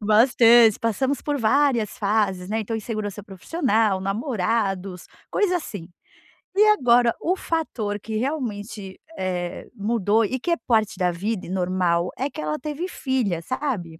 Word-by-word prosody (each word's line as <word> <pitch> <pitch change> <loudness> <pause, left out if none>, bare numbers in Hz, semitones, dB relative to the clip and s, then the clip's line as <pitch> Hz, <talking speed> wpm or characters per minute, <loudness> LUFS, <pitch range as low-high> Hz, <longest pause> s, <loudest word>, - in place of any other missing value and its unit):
Bastante. 230 +1 +5
Passamos 260 +5 0
por 290 -1 -1
várias 240 -2 +2
fases, 200 -3 0
né, 220 +1 -1
então, 225 +1 -3
insegurança 215 -2 -4
profissional, 215 - 0
namorados, 195 - -2 0.2
coisa 370 -4 +2
assim. 200 - -7 0.7
E 415 - +6
agora, 245 - +4
o 360 +3 +1
fator 225 - -3
que 220 +2 -6
realmente, 215 -7 -4 0.2
eh, 180 -2 -3
mudou 220 0 +1
e 260 +5 -2
que 345 - -4
é 335 - +2
parte 220 -2 +2
da 180 -2 +1
vida 195 +3 -3
e - - -9
normal, 180 -2 0
é 270 +3 -1
que - - -6
ela 150 0 -2
teve 300 +6 -4
filha, 250 - -1
sabe? 190 - -3
220 Hz, 145 wpm, -23 LUFS, 190-255 Hz, 0.7 s, E